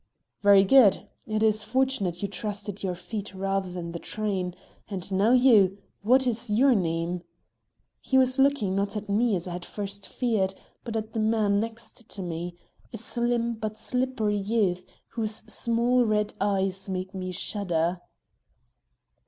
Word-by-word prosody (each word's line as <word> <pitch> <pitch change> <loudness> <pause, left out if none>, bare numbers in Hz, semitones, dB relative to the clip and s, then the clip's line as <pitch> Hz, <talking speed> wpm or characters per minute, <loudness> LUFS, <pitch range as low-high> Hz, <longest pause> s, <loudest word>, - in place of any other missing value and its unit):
"Very 200 -1 +7
good! 210 -1 +5 0.2
It 215 0 0
is 215 -1 +2
fortunate 220 -7 0
you - - +1
trusted 205 +1 -5
your 185 -2 -2
feet 200 +2 -6
rather 195 0 -1
than 175 -1 -5
the 170 - -5
train. 190 -4 -3 0.3
And 195 -2 -5
now 200 +4 +3
you! 220 -7 +5 0.2
What 255 +6 +4
is 240 -1 -1
your 255 +6 +4
name?" 170 -2 -1 0.8
He 265 - +1
was 260 0 +3
looking, 270 -8 +3
not 200 +2 -1
at 210 0 -6
me 215 +1 +2
as 175 0 -3
I - - -5
had 175 - -3
at - - -9
first 200 -1 -6
feared, 210 -6 0 0.3
but 225 -2 -3
at 220 0 -5
the 225 - -2
man 215 -2 +2
next 230 +1 -7
to 195 - -5
me, 175 0 -5 0.3
a - - -6
slim 235 +1 0
but 215 -1 -5
slippery 225 -1 -1
youth, 200 -3 0 0.3
whose 220 -2 -3
small 240 +2 +2
red 210 -2 0
eyes 195 -1 0
made 185 0 -4
me 185 -1 -4
shudder. 175 -2 -1
205 Hz, 160 wpm, -27 LUFS, 190-230 Hz, 0.8 s, Very